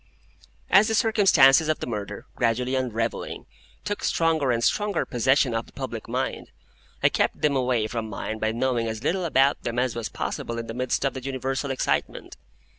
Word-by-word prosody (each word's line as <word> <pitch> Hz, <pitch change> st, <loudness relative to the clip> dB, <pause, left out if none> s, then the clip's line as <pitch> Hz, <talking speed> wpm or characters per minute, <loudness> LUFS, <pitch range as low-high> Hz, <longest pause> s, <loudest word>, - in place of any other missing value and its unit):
As 200 Hz, +2 st, +6 dB
the 220 Hz, -, +1 dB
circumstances 165 Hz, -, +5 dB
of 155 Hz, -, +2 dB
the -, -, -4 dB
murder, 105 Hz, -4 st, -5 dB
gradually 125 Hz, +3 st, 0 dB
unravelling, 120 Hz, -3 st, -2 dB, 0.4 s
took 205 Hz, 0 st, -4 dB
stronger 160 Hz, -4 st, +1 dB
and 115 Hz, -1 st, 0 dB
stronger 205 Hz, -, +1 dB
possession 130 Hz, +1 st, +2 dB
of 115 Hz, 0 st, -2 dB
the -, -, -17 dB
public -, -, -6 dB
mind, -, -, -3 dB, 0.5 s
I -, -, +6 dB
kept -, -, 0 dB
them 150 Hz, -2 st, +3 dB
away 125 Hz, -4 st, +1 dB
from 110 Hz, 0 st, -4 dB
mine 110 Hz, +2 st, -5 dB
by 110 Hz, 0 st, 0 dB
knowing 120 Hz, 0 st, 0 dB
as 110 Hz, +1 st, -5 dB
little 180 Hz, +4 st, 0 dB
about 140 Hz, -3 st, +3 dB
them 120 Hz, 0 st, -4 dB
as 125 Hz, -1 st, 0 dB
was 115 Hz, -2 st, -3 dB
possible 115 Hz, +4 st, -4 dB
in 115 Hz, -, -4 dB
the 115 Hz, -, -6 dB
midst 125 Hz, +2 st, -1 dB
of 135 Hz, -, 0 dB
the 130 Hz, -, -6 dB
universal 135 Hz, +1 st, -3 dB
excitement. 135 Hz, -, -2 dB
130 Hz, 185 wpm, -25 LUFS, 115-145 Hz, 0.5 s, As